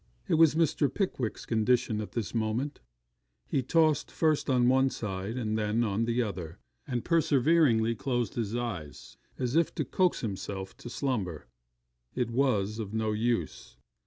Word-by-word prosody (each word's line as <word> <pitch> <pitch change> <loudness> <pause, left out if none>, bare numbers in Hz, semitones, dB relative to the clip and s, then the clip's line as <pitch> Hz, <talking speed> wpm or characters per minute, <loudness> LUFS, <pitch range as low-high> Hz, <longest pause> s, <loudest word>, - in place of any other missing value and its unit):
It - - 0
was 160 -1 +5
Mr. 155 -4 +2
Pickwick's 135 - -2
condition 115 0 +1
at 105 - -8
this 115 -5 -3
moment: 115 +6 -1 0.7
he 135 - 0
tossed 155 +3 +2
first 155 -3 +1
on 125 -2 +3
one 130 +1 +4
side 100 0 -4
and 110 -3 -1
then 110 +2 +1
on 110 +1 0
the 120 +1 +1
other; 90 -5 -6 0.3
and 125 -4 -2
perseveringly 145 -7 +3
closed 120 -1 -2
his 115 -2 -2
eyes 100 -12 -5 0.2
as 125 +1 -2
if 165 -1 +2
to - - -1
coax 185 -2 +1
himself 95 -2 -5
to - - -9
slumber. 110 - -2 0.7
It 125 -2 -1
was 115 -5 +1
of 110 -1 -5
no 110 -1 0
use. 110 - -2
120 Hz, 155 wpm, -29 LUFS, 105-135 Hz, 0.7 s, was